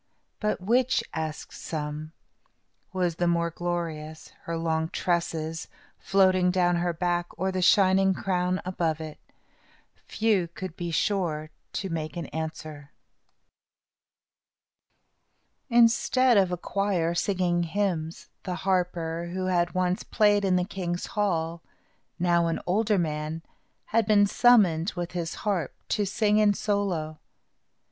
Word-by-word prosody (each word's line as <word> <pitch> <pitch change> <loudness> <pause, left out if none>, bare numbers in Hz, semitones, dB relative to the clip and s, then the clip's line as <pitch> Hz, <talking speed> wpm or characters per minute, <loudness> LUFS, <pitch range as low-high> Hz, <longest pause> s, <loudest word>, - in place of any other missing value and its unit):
"But 210 -1 -1
which," 245 +6 +2
asked 155 -1 -5
some, 155 0 -5 0.8
"was 180 -3 -1
the 175 - +1
more 170 0 +1
glorious, 160 -3 -4 0.2
her 165 0 -3
long 160 -1 -1
tresses, 165 -3 -2 0.3
floating 185 0 +3
down 175 -1 +2
her 175 0 0
back, 175 +1 -1
or 190 +1 0
the 185 0 -2
shining 190 +1 +4
crown 185 -1 -1
above 165 -4 -1
it?" 155 -1 -8 0.9
Few 210 -6 +1
could 170 0 -8
be 175 -2 -4
sure 165 -3 -1 0.3
in 190 -3 -4
making 160 +1 -4
answer. 155 -2 -6 2.8
Instead 240 +1 +4
of 190 -3 +4
a 180 - -1
choir 180 -3 0
singing 175 -1 +1
hymns, 170 -2 -2
the 180 - -4
harper, 175 -3 -1
who 185 0 -2
had 175 -1 +1
once 185 0 +1
played 205 -1 +2
in 190 -2 +2
the 180 0 +1
king's 180 -2 -4
hall, 170 -5 -1 0.6
now 170 -1 +2
an 165 - -1
older 210 +3 +2
man, 155 -1 -2 0.4
had 225 -1 +1
been 205 -1 +5
summoned, 200 -7 +4
with 175 -1 -4
his 170 -1 -3
harp, 185 -9 -1
to 205 -2 0
sing 210 +2 +2
in 210 -1 +4
solo. 185 -8 -1
175 Hz, 125 wpm, -27 LUFS, 165-195 Hz, 2.8 s, been